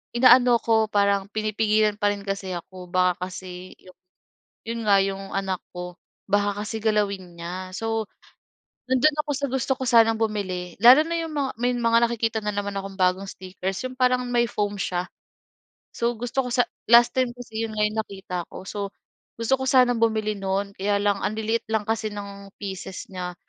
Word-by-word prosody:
inaano 245 0 +7
ako 220 -1 +2
parang 200 -1 +3
pinipigilan 215 -1 +1
pa 205 -1 +3
rin 200 - -7
kasi 195 -2 -3
ako. 180 +1 -9
Baka 180 -1 +2
kasi 180 0 -9
'yong, 185 - -17 0.7
'yon 230 0 -3
nga 200 -1 +6
'yong 195 0 -2
anak 190 -2 -2
ko 180 0 -7 0.3
baka 205 0 +1
kasi 220 - -4
galawin 200 -5 0
niya. 185 +2 -6
So, 225 +1 -2 0.8
nando'n 285 +4 +3
ako 290 - -2
sa 280 - -1
gusto 265 0 +1
ko - - -2
sanang 225 -1 +5
bumili 185 -5 -2
lalo 255 +5 +10
na 335 - -2
'yong 325 -2 -4
mga 280 -3 -1
may 245 0 +2
mga 230 -1 +3
nakikita 230 -1 -1
na 210 - -1
naman 200 0 -2
akong 195 0 -5
bagong 185 +1 +2
stickers. 190 +2 -5
'Yong 255 0 -6
parang 250 0 +3
may 240 -1 +3
foam 205 0 -2
siya. 180 0 -2 0.9
So 235 +1 -1
gusto 245 +2 -1
ko - - -4
sa 245 - +5 0.3
last 235 0 +8
time 255 -2 +1
kasi 225 -2 -5
'yon 220 - -8
nga 210 - +1 0.2
nakita 190 -2 -7
ko. - - -9
So 200 -1 -4 0.5
gusto 250 +4 +2
ko - - -1
sanang 250 -2 +4
bumili 215 -2 +1
no'n 195 +1 -1
kaya 200 +1 +1
lang 205 -1 +2
anliliit 220 +2 -1
lang 220 -1 +2
kasi 220 -1 0
ng 200 -1 -8
pieces 190 -1 -6
niya. 180 -1 -5
210 Hz, 180 wpm, -24 LUFS, 195-235 Hz, 0.9 s, lalo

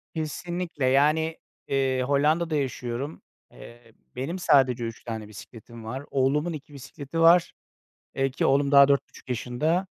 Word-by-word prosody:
Kesinlikle, 165 -1 -3
yani, 155 +5 +2 0.3
eee, 135 -1 0
Hollanda'da 155 +4 +1
yaşıyorum. 135 0 -4 0.3
Eee, 120 -1 -15 0.2
benim 150 +9 -4
sadece 130 -7 +3
3 115 -1 -6
tane 110 -2 -6
bisikletim 115 +3 -12
var. 130 +5 -5
Oğlumun 145 +5 +1
2 145 0 -10
bisikleti 140 +3 -7
var, 165 +1 +5 0.6
eee, 135 0 0
ki 130 - -1
oğlum 140 +1 +2
daha 140 0 +8
4,5 140 -1 -1
yaşında. 135 +10 -1
140 Hz, 130 wpm, -26 LUFS, 125-155 Hz, 0.6 s, daha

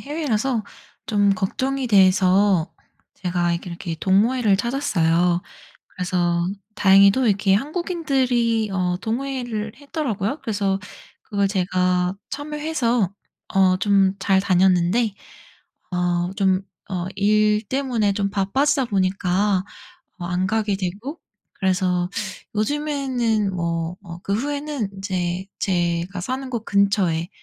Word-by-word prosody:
해외라서 270 -5 -1 0.4
좀 205 -2 +3
걱정이 260 +7 -1
돼서 190 -3 +4 0.4
제가 175 -1 -1
이렇게, 170 +1 -4
이렇게 170 -1 -5
동호회를 210 +2 +3
찾았어요. 180 - +1 0.5
그래서 175 -1 0 0.3
다행히도 200 +5 +5
이렇게 200 -1 +3
한국인들이 260 - 0
어 180 -2 0
동호회를 235 -2 -3
했더라고요? 280 - -3
그래서 200 -3 -1 0.4
그걸 200 -2 0
제가 180 -1 +1
참여해서 290 - -1 0.4
어 185 -1 +4
좀 195 -1 +3
잘 190 0 +3
다녔는데 190 +3 +3 0.8
어 175 0 0
좀 190 -2 +2 0.3
어 180 -2 -3
일 210 +1 +3
때문에 245 -5 0
좀 200 0 -1
바빠지다 265 +8 +1
보니까 190 -1 +1 0.6
어 175 - -6
안 180 +1 0
가게 210 -1 0
되고 205 - -5 0.3
그래서 180 -1 0 0.4
요즘에는 245 -4 0
뭐 170 0 -2
뭐 175 -3 -10
그 200 - -1
후에는 285 -2 -2
인제 185 -2 -3
제가 175 0 -1
사는 260 +6 -4
곳 235 -3 -3
근처에 195 -5 +1
200 Hz, 245 characters per minute, -22 LUFS, 185-240 Hz, 0.8 s, 다행히도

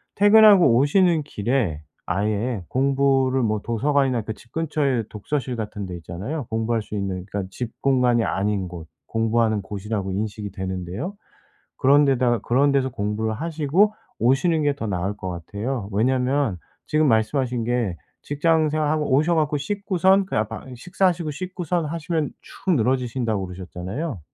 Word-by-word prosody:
퇴근하고 205 - +7
오시는 160 +4 +3
길에 110 - -1 0.2
아예 105 +1 -1
공부를 135 0 +2
뭐 110 -2 0
도서관이나 130 +1 +1
그 110 +1 -5
집 115 +2 -20
근처에 150 -6 0
독서실 125 +4 -3
같은 105 -2 -5
데 90 - -6
있잖아요? 105 - -5
공부할 115 0 0
수 105 - -12
있는 95 -2 -3
그러니까 100 -1 -4
집 115 +3 -5
공간이 125 -4 +3
아닌 100 -2 -1
곳. 85 -2 -9 0.2
공부하는 115 -1 +1
곳이라고 100 0 -4
인식이 105 +1 -3
되는데요. 95 - -5 0.6
그런 145 +2 +5
데다가 125 -3 +2
그런 130 +7 +2
데서 135 -1 +2
공부를 110 -1 -2
하시고 165 - +1 0.3
오시는 150 +7 +2
게 145 -1 +2
더 115 - -4
나을 95 +1 -2
것 95 - -6
같아요. 100 +6 -4
왜냐하면 125 0 +1 0.3
지금 155 0 +2
말씀하신 120 +1 +1
게 120 -7 -1 0.3
직장 155 +1 +2
생활하고 155 -1 0
오셔 155 +5 +3
갖고 150 -2 +1
씻고선 195 +3 +2
그냥 110 - -1
방 125 +3 -8
식사하시고 175 +3 0
씻고선 180 0 -3
하시면 160 0 -2
축 190 - -6
늘어지신다고 120 -4 0
그러셨잖아요? 95 - -5
125 Hz, 355 characters per minute, -23 LUFS, 105-150 Hz, 0.6 s, 퇴근하고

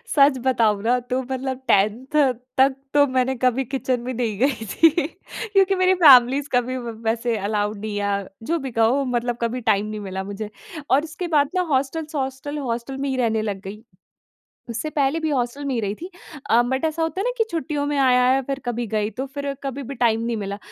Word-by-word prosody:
सच 275 -2 +5
बताऊँ 220 -5 +2
ना 245 +2 +2
तो 255 +1 +1
मतलब 260 0 -4
10th 210 +5 +2 0.5
तक 265 0 +4 0.2
तो 290 0 +6
मैंने 255 +1 +2
कभी 255 +1 +1
किचन 255 -1 -2
भी 255 +1 -4
नहीं 225 -4 -2
गई 255 -4 +1
थी 330 - +6 0.6
क्योंकि 390 0 +4
मेरी 370 0 +3
फैमिलीज़ 270 +1 +7
कभी 250 +1 +1
व 240 -2 -5 0.2
वैसे 230 +1 0
अलाउड 205 +1 -1
नहीं 210 0 -4
है, 200 -1 -1 0.2
जो 335 +7 0
भी 265 -2 -5
कहो 230 +5 +2
मतलब 240 0 -1
कभी 235 +2 -1
टाइम 205 +1 +1
नहीं 215 0 -5
मिला 190 -1 -5
मुझे। 205 +2 -6 0.4
और 280 +3 +4
उसके 345 +2 -5
बाद 285 -1 +3
ना 365 - +3
हॉस्टल्स 300 +4 -2
हॉस्टल 270 +2 -3
हॉस्टल 235 +3 -3
में 275 0 -2
ही 265 - -1
रहने 225 -3 +1
लग 205 -3 -3
गई, 205 +3 -9 0.9
उससे 235 +7 -3
पहले 290 +2 +1
भी 315 - -1
हॉस्टल 265 +1 -2
में 275 -2 -1
ही 230 - 0
रही 205 -1 -2
थी। 350 - -9 0.4
अ, 235 +2 +6
बट 265 +4 -2
ऐसा 320 +1 -1
होता 325 +4 -2
है - - -1
ना - - +1
कि 450 - +3
छुट्टियों 295 -2 -2
में 290 0 -1
आया 250 -2 +4
है 270 +1 +2
फिर 275 +1 -3
कभी 240 -1 -2
गई 215 0 -1
तो 260 +6 -5
फिर 280 +1 -4
कभी 275 0 -4
भी 275 +2 -7
टाइम 225 -2 +3
नहीं 235 0 -1
मिला। 200 -1 -4
255 Hz, 215 wpm, -22 LUFS, 225-280 Hz, 0.9 s, फैमिलीज़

